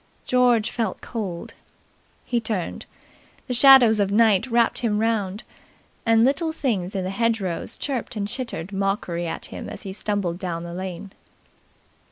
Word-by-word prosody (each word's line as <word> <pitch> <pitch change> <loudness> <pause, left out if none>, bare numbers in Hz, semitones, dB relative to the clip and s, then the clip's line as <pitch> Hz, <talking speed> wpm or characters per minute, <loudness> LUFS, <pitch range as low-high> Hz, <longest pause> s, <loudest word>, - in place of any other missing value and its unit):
George 245 -3 +3
felt 225 -6 -2
cold. 195 -8 -5 0.7
He 240 - 0
turned. 215 -6 -4 0.6
The 250 - -3
shadows 245 -4 +7
of 200 -1 +1
night 220 0 +4
wrapped 235 -1 +2
him 220 -3 0
round, 215 -2 -1 0.6
and 225 0 +5
little 315 +5 +1
things 210 - -2
in 190 - -1
the 185 - -3
hedgerows 205 -4 -1
chirped 260 -5 -4
and 205 -1 -2
chittered 205 -6 -4
mockery 195 -3 -1
at - - -4
him - - -6
as - - -7
he 190 - -6
stumbled 200 -4 -2
down 170 -3 -4
the 170 0 -7
lane. 185 +1 -6
210 Hz, 150 wpm, -23 LUFS, 190-235 Hz, 0.7 s, shadows